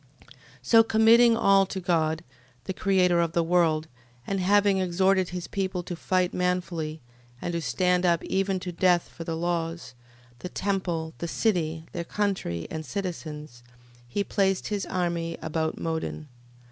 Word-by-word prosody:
13:14. - - -22 0.3
So 225 - +6
committing 225 +1 +5
all 195 -3 +4
to 190 - -4
God, 160 -3 0 0.4
the 190 - -4
Creator 180 -2 +2
of 165 -1 0
the 170 - +2
world, 165 -2 +2 0.4
and 195 - -2
having 200 +1 +3
exhorted 185 +1 +2
his 180 -1 -5
people 190 -2 -2
to 175 - -5
fight 180 +1 0
manfully, 175 -3 -2 0.4
and 175 - -4
to 170 - -1
stand 180 +6 +1
up 170 -2 +2
even 195 0 0
to 180 - -4
death 175 0 +2
for 165 - -9
the 165 0 -3
laws, 170 -1 -3 0.5
the 180 - -6
temple, 180 -5 -2
the 170 - -3
city, 165 -5 0
their 170 - -4
country, 185 - -2
and 160 0 -4
citizens: 155 -8 -6 0.5
he 160 +12 -1
placed 195 -2 0
his 205 -2 -2
army 170 -2 -2
about 160 0 -2
Modin. 160 -1 -4
175 Hz, 155 wpm, -26 LUFS, 165-190 Hz, 0.5 s, So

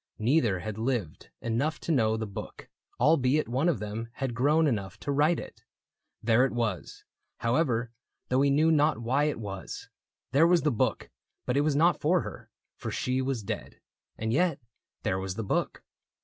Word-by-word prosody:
Neither 115 - +2
had 110 +1 -5
lived 115 - -2
enough 130 +7 -1
To - - -2
know 110 -6 +2
the 110 - -3
book, 100 -2 -8 0.3
albeit 145 +1 +3
one 135 +8 +1
of 165 - +1
them 105 +2 -5
Had 135 -2 -3
grown 150 +7 +3
enough 105 - -2
to 145 - -2
write 150 +4 +3
it. - - -10 0.6
There 115 +2 +4
it 135 - +1
was. 115 -7 -3 0.3
However, 120 -2 +1 0.4
though 130 +1 +3
he 140 - +4
knew 155 +4 +4
not 150 -3 +3
why 130 +6 +1
it 150 -6 -1
was: 100 -3 -7 0.4
There 155 +5 +5
was 175 -1 +4
the 150 - +3
book, 115 - -1 0.3
but 125 - 0
it 140 - +4
was 150 -1 +1
not 165 +1 +3
for 175 +4 +3
her, - - -9 0.3
For - - -5
she 130 +1 -1
was 130 -4 -2
dead. - - -6 0.4
And 110 +1 -2
yet, 175 +4 +2 0.4
there 95 - 0
was 95 -1 -4
the 115 - -3
book. 100 - -1
125 Hz, 180 wpm, -28 LUFS, 110-150 Hz, 0.6 s, There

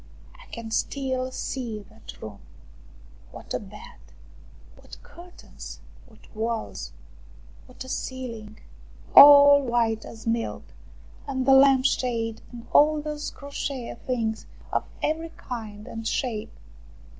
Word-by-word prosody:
I - - -17
can 230 -1 -7
still 260 +2 -1
see 235 -5 -5
that 220 +1 -13
room. 105 -2 -8 0.9
What - - -9
a - - 0
bed! - - -12 0.8
What - - -14
curtains! 355 +1 -12 0.3
What 220 -3 -20
walls! 220 - -3 0.8
What - - -10
a - - -12
ceiling! 230 -5 -6 0.6
All 285 0 +10
white 235 -3 0
as 225 -1 -11
milk. 230 0 -2 0.6
And 260 -2 -2
the 270 - +6
lamp 265 -1 +6
shade, 230 -4 0
and 235 -1 -10
all 305 +1 +5
those 300 0 -4
crochet 280 -3 -5
things 230 -3 -3 0.2
of - - 0 0.2
every 325 +2 -1
kind 215 -4 -7
and 225 0 -6
shape 220 - -3
245 Hz, 120 wpm, -25 LUFS, 225-275 Hz, 0.9 s, All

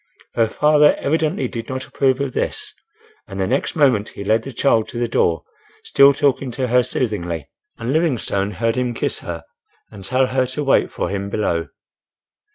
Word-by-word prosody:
Her 115 -1 +2
father 150 +5 +4
evidently 160 +6 0
did 115 -2 -7
not 130 0 -4
approve 130 -1 +1
of 140 -2 -2
this, - - -3 0.5
and 95 0 -7
the 95 - +1
next 130 +7 -1
moment 130 -9 +3
he 100 - -8
led 110 +3 +2
the 135 - -8
child 115 -3 +2
to - - -7
the 120 0 0
door, 85 -8 +1 0.4
still 140 0 +6
talking 140 -1 0
to 130 0 -2
her 125 +1 +5
soothingly, 90 - -3 0.3
and 120 +4 -2
Livingstone 125 - 0
heard 115 -1 0
him 125 -2 -1
kiss - - -2
her 85 -1 -6 0.5
and 100 -2 -11
tell 130 +6 +2
her 130 0 0
to 130 +4 -4
wait 135 - +3
for - - -3
him 100 0 -3
below. 85 -6 -1
125 Hz, 180 wpm, -20 LUFS, 105-135 Hz, 0.5 s, still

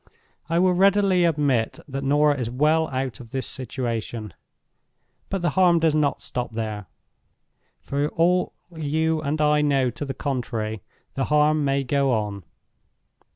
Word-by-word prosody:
I 165 - +1
will 180 +1 +4
readily 195 -1 +4
admit 145 -8 +1
that 135 -1 -5
Norah 145 +2 +3
is 120 -2 -2
well 155 +6 +2
out 130 -5 -3
of 120 - -11
this 130 +2 -3
situation. 120 -4 -4 1.0
But 195 -2 -3
the 175 - +2
harm 180 -2 +4
does 160 -2 +2
not 150 -2 0
stop 120 -2 -4
here. 105 -3 -4 0.9
For 140 +1 -1
all 180 +2 +1 0.2
you 160 +1 0
and 150 +1 -2
I 150 0 +3
know 135 -4 +2
to 120 - -6
the 135 -2 -4
contrary, 115 -6 -3 0.3
the 135 - -1
harm 150 0 +3
may 140 0 +1
go 135 0 +1
on. 105 -3 -2
140 Hz, 150 wpm, -24 LUFS, 125-160 Hz, 1.0 s, will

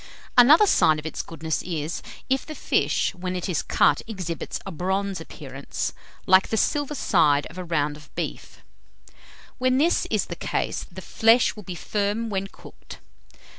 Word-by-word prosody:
Another 285 - +8
sign 155 - +4
of 150 - -7
its 160 - -3
goodness 160 -1 -3
is, 165 -2 -4 0.3
if 265 0 +1
the 310 - -8
fish, - - +1
when 185 0 -4
it 180 - -3
is 180 -5 0
cut, 145 - +3
exhibits 185 -7 -4
a 195 - -5
bronze 190 +2 -2
appearance, 140 -4 -5 0.3
like 190 +1 +5
the 220 - -1
silver 290 +4 0
side 150 - +3
of 180 - -9
a - - -4
round 150 -4 -1
of 150 0 -18
beef. - - -6 1.0
When 255 0 +2
this 325 +5 +2
is - - +1
the - - -6
case, - - -2
the - - -9
flesh 225 +2 +3
will 210 - -9
be 180 -2 -7
firm 210 +5 -2
when 195 0 -2
cooked. - - -13
185 Hz, 170 wpm, -24 LUFS, 160-225 Hz, 1.0 s, Another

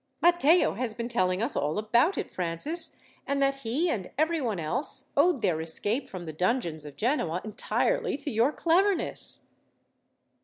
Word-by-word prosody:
"Matteo 345 0 +4
has 225 0 -3
been 235 -1 -3
telling 185 -4 0
us 250 - -1
all 150 +4 -1
about 235 - +2
it, - - -4
Francis, 185 - +1 0.3
and 280 0 0
that 275 0 +2
he, 275 +7 -1
and 205 - -2
everyone 300 - 0
else, 260 - -2
owed 285 -4 +3
their 170 -5 +1
escape 205 - -2
from 180 -2 -7
the 160 - -6
dungeons 170 - -1
of 145 -1 -10
Genoa 195 - 0
entirely 475 - -1
to 285 0 -5
your 230 +5 +2
cleverness." 360 +4 +1
240 Hz, 155 wpm, -28 LUFS, 185-300 Hz, 0.3 s, Matteo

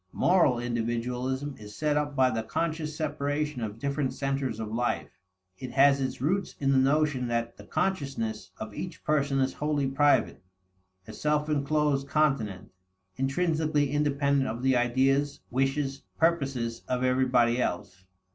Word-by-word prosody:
Moral 170 -9 +3
individualism 120 +3 -2
is 105 -1 -10
set 150 -1 +1
up 145 -1 -1
by 130 -2 +4
the 115 - -1
conscious 155 +5 -2
separation 150 -2 -2
of 110 -1 -4
different 140 +2 -2
centers 135 -4 -2
of 110 -1 -4
life. 120 +1 -1 0.5
It 130 - -7
has 140 0 +5
its 130 -1 -2
roots 180 +8 -1
in 135 -1 +2
the 135 - +4
notion 140 -1 +2
that 115 0 -2
the - - -12
consciousness 135 - -2
of 110 -1 -7
each 180 - -7
person 145 -3 +1
is 130 0 +1
wholly 150 -2 -1
private, 145 +2 +2 0.7
a 110 - -8
self 150 +4 0
inclosed 145 -1 +1
continent, 135 -12 0 0.5
intrinsically 150 +1 +1
independent 140 -2 +1
of 115 +3 -5
the 130 -1 +3
ideas, 135 +4 +1
wishes, 135 +2 0 0.2
purposes 135 -8 0
of 125 0 -1
everybody 125 -2 +3
else. 95 -2 -3
135 Hz, 145 wpm, -28 LUFS, 125-150 Hz, 0.7 s, has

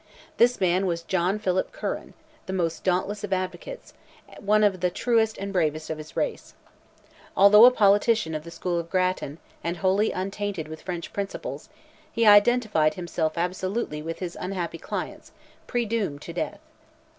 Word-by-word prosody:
This 245 0 +4
man 185 +1 +2
was 170 -1 -2
John 185 +3 0
Philpot 185 -3 -1
Curran, - - -5 0.3
the 190 - -4
most 165 -3 -1
dauntless 195 +3 0
of 205 - -5
advocates, 190 - -4 0.5
one 215 +1 +3
of 195 -3 +2
the 180 +1 +1
truest 225 +2 +1
and 200 0 -5
bravest 155 -3 0
of 155 - -4
his 155 0 -11
race. - - -3 0.8
Although 210 +3 +9
a - - +10
politician 205 -5 +3
of 155 -1 -4
the 170 - -9
school 175 +1 -2
of 170 0 -6
Grattan, 185 -5 -1 0.3
and 170 +1 -2
wholly 195 +4 +2
untainted 195 -3 -3
with 155 0 -9
French 175 -3 -6
principles, 200 - -5 0.4
he 230 -1 +1
identified 205 -7 +5
himself 170 -2 -2
absolutely 185 -1 -2
with 165 +1 -5
his 180 -2 -5
unhappy 180 -3 -4
clients, - - -6 0.3
"predoomed 225 - -2
to - - -7
death." - - -4
185 Hz, 155 wpm, -25 LUFS, 170-205 Hz, 0.8 s, a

